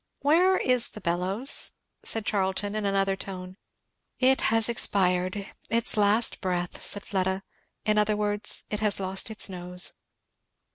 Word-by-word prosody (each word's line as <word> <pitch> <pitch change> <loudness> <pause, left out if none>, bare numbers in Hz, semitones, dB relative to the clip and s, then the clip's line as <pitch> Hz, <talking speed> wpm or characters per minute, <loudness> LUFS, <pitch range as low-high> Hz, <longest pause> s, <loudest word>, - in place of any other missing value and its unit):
"Where 355 +6 +4
is 250 -2 +3
the - - -10
bellows?" 190 +8 0 0.3
said 225 -2 -1
Charlton 200 0 -1
in 215 -1 -2
another 195 0 +1
tone. 185 -1 -7 0.6
"It 265 +1 +3
has 225 0 +3
expired 185 -4 +1 0.2
its 230 0 +1
last 210 +2 +2
breath," 180 -2 -3
said 205 - +3
Fleda. 190 -1 -2 0.4
"In 215 0 +2
other 210 0 +1
words, 210 0 0
it 210 - -2
has 210 -2 +2
lost 190 +2 -2
its 220 - +1
nose." 180 -1 0
205 Hz, 140 wpm, -26 LUFS, 190-220 Hz, 0.6 s, Where